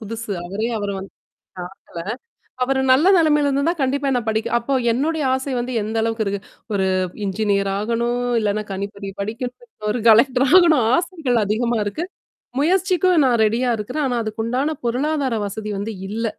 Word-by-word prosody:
புதுசு. 225 0 -6 0.2
அவரே, 205 +5 -2
அவர 205 -1 -3
வந்து. 195 - -9 0.5
பாக்கல. 180 -1 -9 0.6
அவரு 265 +1 +1
நல்ல 295 +7 +4
நிலமையில 300 -3 +3
இருந்திருந்தா, 280 +5 +1
கண்டிப்பா 275 +1 0
என்ன 245 - +1
படிக்க 220 0 0
அப்ப 260 +3 0
என்னுடைய 300 +4 0
ஆசை 265 +1 -3
வந்து 245 +1 -3
எந்த 220 +2 -4
அளவுக்கு 225 -1 0
இருக்கு? 200 0 -2 0.3
ஒரு 190 -2 +1 0.4
இன்ஜினியர் 200 0 0
ஆகணும், 235 +3 -1 0.2
இல்லன்னா 210 0 -1
கணிப்பொறி 200 +1 -5
படிக்கணும் 245 - -6
ஒரு 235 - -1
கலெக்டர் 250 +4 +5
ஆகணும், 335 -9 +6
ஆசைகள் 315 - 0
அதிகமா 230 +3 0
இருக்கு. 205 +12 -3 0.6
முயற்சிக்கும் 365 0 +3
நான் 240 -3 +2
ரெடியா 235 +4 +1
இருக்கிறேன். 250 +8 -2
ஆனா 245 -2 -1
அதுக்குண்டான 235 +8 -2
பொருளாதார 270 +1 0
வசதி 215 +2 -6
வந்து 215 +2 -4 0.2
இல்ல. 225 +2 -2
235 Hz, 150 wpm, -21 LUFS, 215-280 Hz, 0.6 s, ஆகணும்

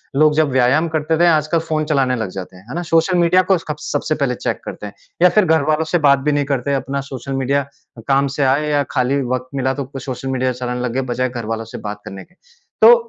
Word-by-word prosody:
लोग 155 +2 +4
जब 155 -1 +3
व्यायाम 130 +6 +3
करते 160 0 0
थे, 175 - +5
आजकल 155 0 +2
फ़ोन 155 -1 -2
चलाने 135 -4 +1
लगते 115 - -2
हैं 100 - -4
जाते 90 - -18
हैं, 90 - -16
है 135 - -6
ना, 175 - -1
सोशल 165 +3 +3
मीडिया 175 +2 +4
को 190 - +5
स्कब 150 -3 -6
सबसे 150 +1 -1
पहले 140 -4 -1
चेक - - -3
करते - - -7
हैं। 100 - -11 0.3
या 180 - +7
फिर 195 +3 +3
घरवालों 155 -1 +2
से 175 - +4
बात 140 0 +5
भी 150 +2 0
नहीं 145 -1 +1
करते, 140 0 -1
अपना 140 0 -2
सोशल 135 +1 -5
मीडिया 140 +1 +1 0.4
काम 140 0 +3
से 145 - +2
आए 140 +3 +2
या 145 -1 +2
खाली 135 +1 +1
वक़्त 130 0 -3
मिला 130 -1 0
तो 140 - -4
कोई 135 0 -9
सोशल 130 +1 -5
मीडिया 130 0 0
चलाने 125 0 -4
लग 125 -2 -2
गए, 135 - 0
बजाए 130 +1 0
घर 120 -2 -6
वालों 115 +1 -3
से - - -5
बात 105 0 -7
करने 95 0 -8
के। 180 - -26 0.5
तो 480 - +9
140 Hz, 255 wpm, -19 LUFS, 130-155 Hz, 0.5 s, तो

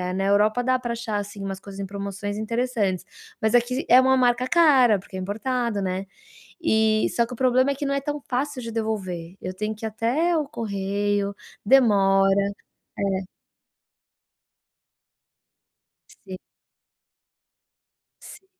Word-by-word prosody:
na 195 +1 -1
Europa 210 +4 +3
dá 255 +1 +2
pra 240 -1 -3
achar, 225 -2 -3
assim, 205 0 -6
umas 195 -1 -4
coisas 200 -1 -10
em 195 - -3
promoções 200 +1 -5
interessantes, 220 -4 -1 0.4
mas 220 0 +1
aqui 250 +3 +1
é 250 +1 +8
uma 265 0 +3
marca 250 0 +2
cara, 270 -10 +5
porque 190 - -13
é - - -4
importado, 225 +3 -2
né, 185 +1 -2 0.6
e 220 -6 +2
só 235 - +3
que 250 - -8
o - - -6
problema 255 +1 +3
é - - -2
que 285 +1 -4
não 275 - 0
é 275 - -1
tão 295 +1 -3
fácil 265 +2 -2
de 230 -1 -6
devolver, 190 -6 -4
eu 185 - -5
tenho 215 +2 -3
que 220 +1 -7
ir - - 0
até 260 +11 0
o 295 -2 -1
correio, 200 -3 -2 0.3
demora, 195 -6 +4 0.7
é. 190 -2 -1 3.0
Sim. 190 -1 -7 1.9
Sim. 385 -2 -13
220 Hz, 145 wpm, -24 LUFS, 200-255 Hz, 3.0 s, é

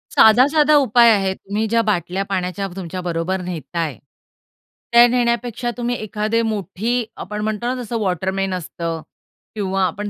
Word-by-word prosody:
साधा-साधा 290 +7 +6
उपाय 240 -3 +5
आहेत. 195 -2 +1
तुम्ही 210 +3 -3
ज्या 230 +1 +2
बाटल्या 190 0 -1
पाण्याच्या 195 0 -2
तुमच्या 185 -1 -5
बरोबर 175 +2 -2
नेत 175 -2 -7
आहे. 160 -6 -1 0.9
त्या 235 0 +8
नेण्यापेक्षा 240 0 0
तुम्ही 245 0 -1
एखादी 215 +1 -1
मोठी 220 +2 -2 0.2
आपण 210 +3 -5
म्हणतो 215 +1 -2
ना 250 +1 0
जसं 230 +1 -3
वॉटरमन 190 0 -1
असतं 165 -2 -4 0.5
किंवा 195 -2 -1
आपण 205 +2 -3
205 Hz, 145 wpm, -20 LUFS, 185-235 Hz, 0.9 s, त्या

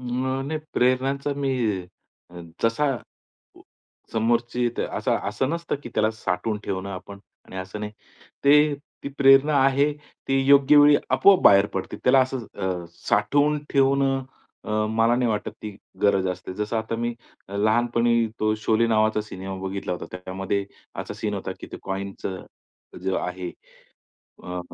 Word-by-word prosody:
न 130 +2 -2
नाही. 155 +1 -2
प्रेरणांचा 135 +3 +1
मी 140 -1 -1 0.8
अ, 90 0 -10 0.2
जसा 115 +6 +2
अ, 120 - -5 0.6
उ - - -16 0.5
समोरची 120 +2 +1 0.2
असं - - -2 0.2
असं 130 - -1
नसतं 170 +1 -2
की - - -7
त्याला 110 +1 +2
साठवून 110 0 -2
ठेवणं 95 0 -3
आपण 100 +1 -8 0.3
आणि - - -12
असं 95 +3 -6
नाही. 105 0 -5 1.1
ती 140 - -4
प्रेरणा 135 +2 +6
आहे, 140 +2 +3 0.4
ती 135 0 +2
योग्य 140 +1 +6
वेळी 145 0 +7
आपोआप 155 +9 +5
बाहेर 100 0 +7
पडते. 95 - -4
त्याला 135 +1 +5
अ, 130 - +6
असं 95 -9 -4 0.2
साठवून 145 +9 +2
ठेवणं 135 -1 +2 0.4
अ, - - -9 0.2
मला 115 +2 +3
नाही 125 -1 +1
वाटत 105 -1 -2
ती 105 -2 -7 0.3
गरज 100 -2 +3
असते. 90 0 -5
जसं 105 +3 -2
आता 110 +1 -2
मी 120 0 -2 0.4
लहानपणी 115 +3 +2
तो 110 0 +2
शोले 110 +1 +2
नावाचा 110 -1 +2
सिनेमा 95 -2 -7
बघितला 95 0 -4
होता. 90 - -6
त्यामध्ये 95 +2 -3 0.4
असा - - -7
सीन - - -3
होता - - -4
की - - -9
ते - - -6
कॉईनचं 95 -1 -5 0.6
जे 95 0 0
आहे, 90 0 -4 1.0
अ, 90 0 -5
115 Hz, 150 wpm, -24 LUFS, 100-135 Hz, 1.1 s, वेळी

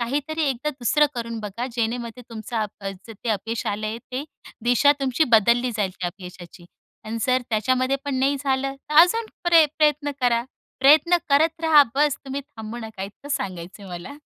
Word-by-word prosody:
काहीतरी 290 +6 -2
एकदा 270 +4 -3
दुसरं 290 +2 +2
करून 230 -1 -4
बघा 210 +4 -5
जेणेमध्ये 235 +1 -3
तुमचं 220 0 -3 0.2
अ, 195 -1 -4 0.2
जे 225 +1 -8
अपयश 220 +2 -3
आलंय 215 +2 -3
ते 265 +3 -3 0.4
दिशा 245 +4 +5
तुमची 270 +3 +2
बदलली 235 +3 +4
जाईल 200 -3 0
त्या 180 - 0
अपयशाची. 180 -1 -12 0.4
आणि 225 +1 -4
जर 255 0 +2
त्याच्यामध्ये 255 +5 +1
पण 285 -1 -2
नाही 275 +2 +2
झालं, 270 0 -1 0.2
तर - - -2
अजून 440 +7 +3 0.2
प्रय 335 -3 +6
प्रयत्न 295 -1 +2
करा. 240 -2 +2 0.4
प्रयत्न 310 +6 +6
करत 315 +3 +3
रहा, 310 -2 +7
बस 290 0 +2
तुम्ही 270 +1 -4
थांबू 235 -5 -9
नका. 220 -4 -7
इतकं 200 +8 -9
सांगायचंय 195 -8 -5
मला. 175 +10 -7
245 Hz, 165 wpm, -23 LUFS, 220-285 Hz, 0.4 s, रहा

